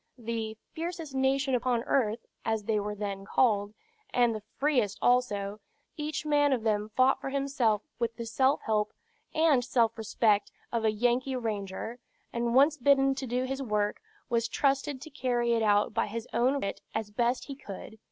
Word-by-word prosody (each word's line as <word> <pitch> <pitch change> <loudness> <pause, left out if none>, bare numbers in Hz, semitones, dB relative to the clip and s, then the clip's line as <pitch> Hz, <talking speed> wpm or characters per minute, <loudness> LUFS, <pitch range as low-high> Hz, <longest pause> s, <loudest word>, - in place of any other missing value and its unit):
The 225 -2 -4 0.2
"fiercest 330 -3 -5
nation 265 +1 +1
upon 245 -1 +1
earth," 230 -4 0 0.2
as 220 -1 -1
they 215 0 +1
were 210 0 -3
then 200 -1 -4
called, 205 -1 +2 0.4
and 240 -2 +3
the 215 - -5 0.2
freest 260 -9 +1
also, 210 -5 +1 0.4
each 300 0 -3
man 290 -2 +3
of 240 -4 -1
them 210 -1 0
fought 260 +1 +4
for - - -3
himself 270 -6 +1 0.2
with 235 -1 -1
the 235 - -5
self 260 +5 +2
help 215 -1 0 0.4
and 310 -6 +4
self 235 -2 +2
respect 215 -1 +2 0.2
of 230 -1 -1
a 220 - +3
Yankee 245 +4 +1
ranger, 220 0 -4 0.3
and 235 0 0
once 290 +3 +5
bidden 275 0 +4
to 265 -1 -5
do 250 +2 0
his 270 +1 -3
work, 210 -4 -1 0.3
was 230 -2 +1
trusted 275 +2 0
to 315 - -9
carry 245 -3 0
it 230 - +2
out 205 -1 +3
by - - +1
his 225 +2 -5
own 255 +4 +2
wit 200 - -3
as 220 -1 -2
best 240 +3 0
he 280 - -6
could. 220 -3 -9
240 Hz, 175 wpm, -29 LUFS, 215-270 Hz, 0.4 s, once